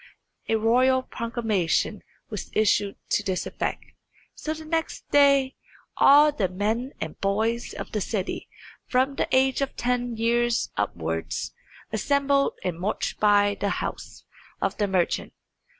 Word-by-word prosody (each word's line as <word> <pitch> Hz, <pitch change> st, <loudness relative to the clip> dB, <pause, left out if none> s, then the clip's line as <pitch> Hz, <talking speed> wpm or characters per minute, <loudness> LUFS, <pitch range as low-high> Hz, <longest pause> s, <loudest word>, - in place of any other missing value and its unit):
A 225 Hz, -, +3 dB
royal 255 Hz, +4 st, +3 dB
proclamation 225 Hz, -8 st, -1 dB, 0.3 s
was -, -, -5 dB
issued 205 Hz, -1 st, +2 dB
to -, -, +2 dB
this 190 Hz, -2 st, -2 dB
effect. -, -, -3 dB, 0.5 s
So 310 Hz, 0 st, -4 dB
the 315 Hz, 0 st, -9 dB
next 325 Hz, +1 st, -2 dB
day 280 Hz, -2 st, +5 dB, 0.4 s
all 295 Hz, +2 st, +7 dB
the 205 Hz, -10 st, -1 dB
men 220 Hz, +8 st, -2 dB
and 155 Hz, -, -6 dB
boys 220 Hz, +4 st, 0 dB
of -, -, -7 dB
the 210 Hz, -, -2 dB
city, 195 Hz, -1 st, -3 dB, 0.4 s
from 260 Hz, +2 st, +2 dB
the -, -, -1 dB
age 265 Hz, +1 st, +3 dB
of 275 Hz, -, -2 dB
ten 245 Hz, -1 st, -1 dB
years 235 Hz, +1 st, +1 dB
upwards, 80 Hz, -5 st, -3 dB, 0.4 s
assembled 280 Hz, +4 st, +2 dB
and 175 Hz, -2 st, -3 dB
marched 195 Hz, +4 st, -2 dB
by 205 Hz, -1 st, +4 dB
the 200 Hz, -, 0 dB
house -, -, -5 dB, 0.3 s
of -, -, -1 dB
the 205 Hz, -, +1 dB
merchant. 185 Hz, -3 st, 0 dB
230 Hz, 135 wpm, -25 LUFS, 200-265 Hz, 0.5 s, all